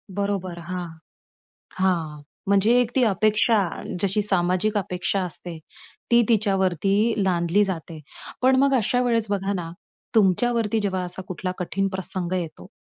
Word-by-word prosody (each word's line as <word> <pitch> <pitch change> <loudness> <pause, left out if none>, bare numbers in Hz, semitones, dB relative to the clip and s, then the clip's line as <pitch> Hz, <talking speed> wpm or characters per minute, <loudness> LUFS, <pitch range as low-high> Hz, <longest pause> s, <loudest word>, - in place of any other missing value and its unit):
बरोबर, 195 -4 -2
हां. 175 +1 -5 0.9
हां. 165 -6 0 0.3
म्हणजे 200 +3 +3
एक 240 0 -2
ती 255 - +4
अपेक्षा, 215 +3 +2 0.4
जशी 200 +1 +1
सामाजिक 190 +2 +1
अपेक्षा 185 0 -1
असते, 175 -1 -6 0.5
ती 235 0 +6
तिच्यावरती 200 0 +2
लादली 180 +2 +2
जाते. 165 -4 -5 0.4
पण 260 +1 +4
मग 275 0 +3
अशा 245 +1 +2
वेळेस 230 -3 +2
बघा 200 0 -1
ना, 170 -3 -4 0.4
तुमच्यावरती 220 +2 +2
जेव्हा 190 -3 -1
असा 180 +1 0
कुठला 185 0 -4
कठीण 195 +2 -1
प्रसंग 190 -2 -4
येतो, 175 -1 -5
195 Hz, 130 wpm, -23 LUFS, 180-215 Hz, 0.9 s, ती